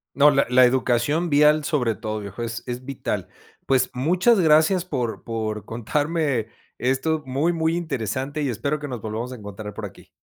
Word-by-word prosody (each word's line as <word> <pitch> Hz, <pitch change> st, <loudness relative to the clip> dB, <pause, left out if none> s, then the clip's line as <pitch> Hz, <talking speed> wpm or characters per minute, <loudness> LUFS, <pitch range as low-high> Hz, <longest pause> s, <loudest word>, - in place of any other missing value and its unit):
No, 145 Hz, +1 st, +7 dB
la 140 Hz, -1 st, +3 dB
la 125 Hz, +1 st, +5 dB
educación 130 Hz, +6 st, +1 dB
vial 150 Hz, +1 st, +5 dB
sobre 135 Hz, -8 st, 0 dB
todo 110 Hz, +1 st, -4 dB
viejo, 100 Hz, +3 st, -6 dB
es 115 Hz, 0 st, -4 dB
es 125 Hz, +1 st, -5 dB
vital. 135 Hz, -1 st, -4 dB, 0.4 s
Pues 130 Hz, -1 st, +2 dB
muchas 180 Hz, -, +3 dB
gracias 160 Hz, +2 st, +4 dB
por 125 Hz, -9 st, -3 dB
por 110 Hz, -2 st, -3 dB
contarme 140 Hz, 0 st, -1 dB, 0.3 s
esto 135 Hz, +5 st, 0 dB
muy 140 Hz, +6 st, +1 dB
muy 165 Hz, -1 st, 0 dB
interesante 140 Hz, -, -3 dB
y 140 Hz, -, 0 dB
espero 140 Hz, +7 st, -2 dB
que 145 Hz, -, -5 dB
nos 125 Hz, -4 st, -6 dB
volvamos 110 Hz, +4 st, -4 dB
a -, -, -6 dB
encontrar 105 Hz, 0 st, -8 dB
por -, -, -6 dB
aquí. -, -, -17 dB
130 Hz, 175 wpm, -23 LUFS, 115-155 Hz, 0.4 s, No